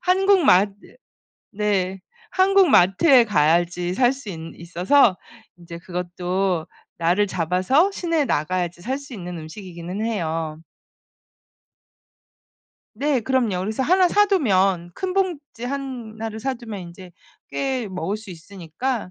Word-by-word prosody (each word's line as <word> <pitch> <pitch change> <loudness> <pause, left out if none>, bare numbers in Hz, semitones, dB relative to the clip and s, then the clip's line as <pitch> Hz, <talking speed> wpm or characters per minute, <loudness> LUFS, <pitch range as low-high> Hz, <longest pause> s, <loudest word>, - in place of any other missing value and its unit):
한국 385 +1 +4
맛 200 0 +5 0.8
네 195 -2 -1 0.3
한국 385 -2 +4
마트에 230 - +5
가야지 175 -1 +1
살 245 +5 +3
수 265 -5 -10
있 170 - -6 0.2
있어서 180 - +2 0.4
인제 170 -1 -10
그것도 180 0 -2 0.3
날을 175 +5 +2
잡아서 185 - +2
시내에 335 -5 0
나가야지 175 - -1
살 260 +6 -2
수 280 -2 -11
있는 180 -4 -7
음식이기는 175 +3 -7
해요. 165 -8 -3 2.3
네 275 +1 0
그럼요. 230 -7 0
그래서 215 +6 -2
하나 365 +6 +4
사두면 195 - +2
큰 375 -1 -3
봉지 330 -11 -2
하나를 235 -5 -5
사두면 235 -5 -4
인제 175 +1 -11 0.4
꽤 265 -4 -2
먹을 190 +2 -3
수 215 -3 -11
있으니까 185 +6 -5
200 Hz, 240 characters per minute, -22 LUFS, 175-265 Hz, 2.3 s, 맛